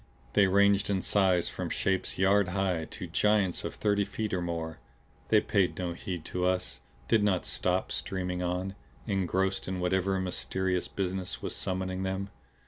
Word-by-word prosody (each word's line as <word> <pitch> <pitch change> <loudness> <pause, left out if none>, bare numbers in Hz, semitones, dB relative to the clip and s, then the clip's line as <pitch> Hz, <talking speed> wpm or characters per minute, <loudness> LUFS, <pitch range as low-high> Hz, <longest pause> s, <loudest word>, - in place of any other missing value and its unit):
They 100 -1 +5
ranged 100 +1 +4
in 95 -2 0
size 95 -4 +3
from - - -4
shapes 95 -1 -1
yard 100 +1 +4
high 90 -3 0
to 90 - -7
giants 100 +2 +2
of - - -4
thirty 100 -1 +2
feet 105 +1 -3
or 90 - 0
more. 85 -2 -3 0.5
They 110 - +6
paid 100 -3 +1
no 90 -2 -2
heed 90 -2 -5
to 90 - -2
us, 90 -9 0 0.3
did 110 - +4
not 95 -4 +2
stop; - - 0
streaming 90 -1 -2
on, 90 +2 -2 0.3
engrossed 95 -1 0
in 95 0 -2
whatever 95 +1 +1
mysterious 95 0 -1
business 95 -1 -3
was - - -3
summoning 95 0 -2
them. 95 +1 -2
95 Hz, 160 wpm, -30 LUFS, 90-100 Hz, 0.5 s, They